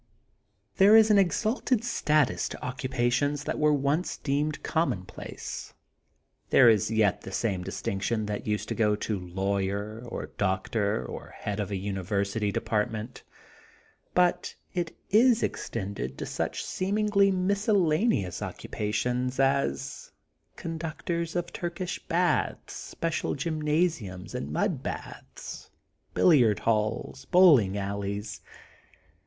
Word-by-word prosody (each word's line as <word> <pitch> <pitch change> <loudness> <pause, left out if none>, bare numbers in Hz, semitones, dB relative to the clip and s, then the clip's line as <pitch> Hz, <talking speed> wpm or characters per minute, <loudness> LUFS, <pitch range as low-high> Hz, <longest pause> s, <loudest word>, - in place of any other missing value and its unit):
There 205 +2 +7
is 220 -1 +7
an 205 - +6
exalted 220 +5 +1
status 155 - +1
to - - -7
occupa 125 -1 -1
tions 145 +3 0
that - - -3
were 150 0 +4
once 145 +4 0
deemed 150 +2 -1
commonplace. 130 - -3 0.7
There 130 - +7
is 105 -3 +3
yet 110 -3 +2
the - - -8
same 95 -3 -1
distinction 105 +4 -2
that 105 0 -4
used 105 0 -1
to - - 0
go 105 -2 +2
to 105 -1 -3
lawyer 100 +4 -2
or 115 - -6
doctor 100 - 0
or - - -8
head 105 0 -3
of 105 - -2
a 100 - -2
uni 95 0 -3
versity 100 +2 -1
department, 110 +4 -2 0.9
but 180 -1 +2 0.2
it 175 -2 -3
is 235 +2 +5
extended 95 - -3
to - - -4
such - - -3
seemingly 200 +1 +2
miscellaneous 190 - +1
occupations 125 +5 -2
as 135 - 0 0.4
con 165 -1 -5
ductors 165 +2 -3
of 175 0 -2
Turkish 175 +1 -4
baths, - - 0
special 165 -1 -3
gymnasiums 150 - -1
and 70 - -4
mud - - 0
baths, - - -7 0.5
billiard 125 - +5
halls, 110 -1 -1
bowling 145 - +6
alleys. 100 +1 -4
125 Hz, 120 wpm, -28 LUFS, 100-170 Hz, 0.9 s, There